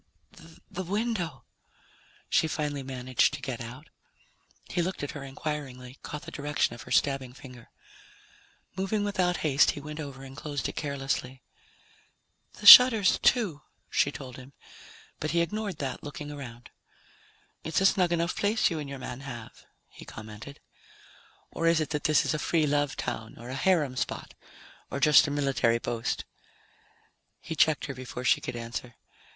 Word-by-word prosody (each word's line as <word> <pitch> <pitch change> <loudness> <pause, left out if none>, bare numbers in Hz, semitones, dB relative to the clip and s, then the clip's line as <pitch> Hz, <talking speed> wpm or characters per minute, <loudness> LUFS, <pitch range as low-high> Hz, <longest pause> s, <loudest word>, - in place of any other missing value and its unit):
"The 190 -1 -4
window," 185 - -2 0.8
she - - +2
finally 145 -2 -2
managed 130 +1 0
to - - -8
get 130 -3 -5
out. 125 +6 -9 0.8
He 175 - -1
looked 180 -2 -3
at 145 - -3
her 145 - -7
inquiringly, 135 -2 -6
caught 150 - -7
the - - -9
direction 145 -3 -1
of 120 - -10
her - - -12
stabbing 135 -3 +1
finger. 125 -2 -13 1.1
Moving 195 +2 -1
without 185 -4 0
haste, 145 -1 +4
he - - -4
went 150 +2 -8
over 140 -3 -7
and 135 0 -10
closed 145 -1 -4
it - - -7
carelessly. 135 -2 -3 1.1
"The - - -11
shutters, 230 -6 +10
too," 200 - +2 0.3
she 145 - +2
told 130 -4 -9
him, 130 +2 -13 0.7
but 155 - -2
he 170 +1 +2
ignored 205 +3 -3
that, 135 -3 -4
looking 145 0 -7
around. 125 -4 -9 0.9
"It's 160 - 0
a 195 - +2
snug 185 -2 +3
enough 170 0 0
place 205 -1 +2
you 160 - -2
and 145 -2 -6
your 140 - -6
man 125 -1 -7
have," 120 -5 -9 0.2
he - - -14
commented. 110 +6 -10 0.9
"Or 165 - -1
is 165 -1 +4
it 155 - -2
that 150 -1 -3
this 155 -2 +4
is - - 0
a 155 - -2
free 160 0 +1
love 145 -1 0
town 110 0 -5
or 120 +2 -10
a - - -4
harem 150 -2 +1
spot, 120 -1 -4 0.6
or 140 - -4
just 150 +2 +6
a - - -2
military 135 -5 +1
post?" 115 -1 -3 1.1
He 160 - -6
checked 155 -1 +3
her 140 - -5
before 125 -1 -7
she - - +4
could - - -5
answer. 120 0 -6
145 Hz, 165 wpm, -28 LUFS, 130-165 Hz, 1.1 s, shutters